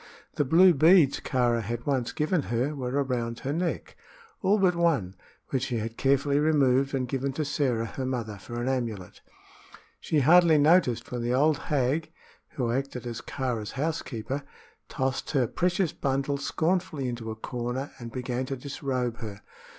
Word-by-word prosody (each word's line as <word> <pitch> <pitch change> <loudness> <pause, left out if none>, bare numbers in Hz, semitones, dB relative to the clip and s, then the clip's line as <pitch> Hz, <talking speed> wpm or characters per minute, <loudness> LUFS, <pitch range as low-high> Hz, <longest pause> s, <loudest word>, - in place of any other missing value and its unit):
The 145 - 0
blue 175 +6 +6
beads 155 -1 +5
Kāra 120 -3 +1
had 120 +3 -5
once 130 -4 0
given 155 +2 0
her 120 +6 0
were 135 0 -1
around 120 -3 -3
her 140 - -2
neck 170 +2 -3 0.5
all 200 +2 +3
but 190 -3 +3
one, 145 - +1 0.3
which 130 -2 -1
she 120 - -2
had 115 +1 -4
carefully 140 +2 +2
removed 140 -3 +3
and 130 -1 -1
given 135 +2 -2
to 155 - -2
Sĕra 135 -5 0
her 130 +3 -5
mother 115 -6 -3
for 120 +5 -7
an 120 - -2
amulet. 115 -8 -3 0.8
She 155 - 0
scarcely 165 +3 +6
noticed 150 -5 +3
when 125 -1 -3
the 120 +1 0
old 150 +2 +3
hag 150 +3 0 0.4
who 120 -4 -1
acted 130 -1 -3
as 120 -1 -5
Kāra's 120 -6 -3
housekeeper 140 -3 -3 0.5
tossed 130 0 -2
her 135 -4 +3
precious 175 - 0
bundle 140 0 -1
scornfully 160 -2 -1
into 120 -2 -5
a 110 - -4
corner 125 +4 -4
and 120 -1 -7
began 125 +1 -3
to 135 - -3
disrobe 130 -3 -3
her. 105 -4 -8
130 Hz, 165 wpm, -27 LUFS, 120-150 Hz, 0.8 s, blue